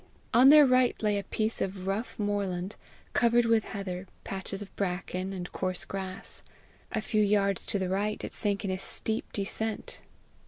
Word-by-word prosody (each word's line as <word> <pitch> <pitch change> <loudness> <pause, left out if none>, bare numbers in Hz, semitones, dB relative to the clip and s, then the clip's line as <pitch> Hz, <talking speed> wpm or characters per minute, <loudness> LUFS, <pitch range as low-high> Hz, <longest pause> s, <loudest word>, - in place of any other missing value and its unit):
On 250 +3 +8
their 300 0 +9
right 255 -1 +4
lay 205 -1 +2
a - - -5
piece 220 +2 -1
of 190 -1 -3
rough 200 +5 -2
moorland, 200 -2 -1 0.4
covered 240 0 +4
with 230 -1 +3
heather, 190 -2 -5 0.2
patches 195 +1 -4
of 200 - -15
bracken, 185 0 -2
and 180 -2 -5
coarse 185 -1 -2
grass. 190 0 -5 0.5
A 220 - -1
few 215 0 +1
yards 200 -2 +2
to - - +2
the 190 -1 -1
right, 205 +3 -1
it - - -5
sank 205 -1 -1
in 190 - 0
a 185 - -2
steep 220 +3 -2
descent. 215 +2 -2
200 Hz, 170 wpm, -29 LUFS, 190-220 Hz, 0.5 s, their